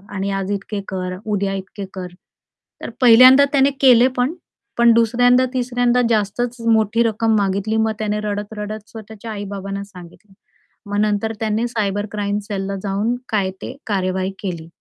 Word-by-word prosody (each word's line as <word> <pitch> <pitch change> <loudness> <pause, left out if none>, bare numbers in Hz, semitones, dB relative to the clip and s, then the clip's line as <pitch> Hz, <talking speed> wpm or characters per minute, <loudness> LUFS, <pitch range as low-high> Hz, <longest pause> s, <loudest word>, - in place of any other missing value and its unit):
आणि 195 +1 -2
आज 195 0 -2
इतके 200 0 -4
कर, 185 -1 -4
उद्या 200 -2 -1
इतके 195 +1 -6
कर. 185 -1 -6 0.8
तर - - -4
पहिल्यांदा 255 +3 +8
त्याने 275 0 +4
केले 250 -2 +6
पण, 250 +6 +1 0.4
पण 235 0 +6
दुसऱ्यांदा-तिसऱ्यांदा 245 +1 +2
जास्तच 230 +3 0
मोठी 225 +1 +3
रक्कम 225 0 +1
मागितली, 200 +2 0
मग 220 0 +1
त्याने 210 -1 -1
रडत-रडत 210 +1 -5
स्वतःच्या 220 0 -9
आई-बाबांना 200 -1 -5
सांगितलं. 190 +1 -15 0.6
मग 205 0 -1
नंतर 215 +1 0
त्यांनी 220 +1 0
सायबर 205 -3 -2
क्राईम 205 -1 -2
सेलला 195 -1 -4
जाऊन 205 +5 -1
काय 200 -4 0
ते 255 - -7
कार्यवाही 190 -1 -1
केली. 170 -5 -5
210 Hz, 140 wpm, -19 LUFS, 200-230 Hz, 0.8 s, पहिल्यांदा